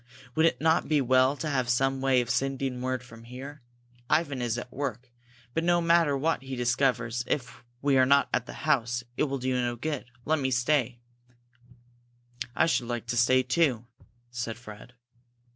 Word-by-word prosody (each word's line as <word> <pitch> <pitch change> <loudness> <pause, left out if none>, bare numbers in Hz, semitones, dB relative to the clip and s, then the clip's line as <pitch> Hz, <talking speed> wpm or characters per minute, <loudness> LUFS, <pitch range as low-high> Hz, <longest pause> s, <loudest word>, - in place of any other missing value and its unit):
Would 160 +3 +4
it - - -1
not 160 +1 +2
be 155 -1 +3
well 130 +1 +3
to 155 - -4
have 130 -4 0
some 135 +2 +1
way 135 -2 +3
of 120 -1 -3
sending 135 0 -1
word 130 0 -2
from 115 -2 -14
here? 135 +4 -9 0.5
Ivan 145 -5 +1
is 120 -1 -1
at 120 0 -7
work. 130 -3 -4 0.4
But 165 - 0
no 175 0 +3
matter 165 -4 +3
what 160 +1 0
he 135 0 -6
discovers, 120 -1 0
if 125 -4 -3 0.2
we 140 -2 +4
are 130 - +6
not 140 +1 +4
at 125 - 0
the - - -7
house, 120 -5 +1
it - - +1
will 140 -1 -2
do 130 0 -1
no 120 -1 0
good. 145 +2 -4 0.2
Let 160 0 +1
me 130 -1 0
stay!" 125 -1 +1 1.5
"I - - +4
should 125 -7 0
like 120 -2 -3
to 120 - 0
stay, 130 +2 +4
too," 130 -3 +1 0.5
said 115 -2 -4
Fred. 110 0 -12
130 Hz, 180 wpm, -28 LUFS, 120-140 Hz, 1.5 s, are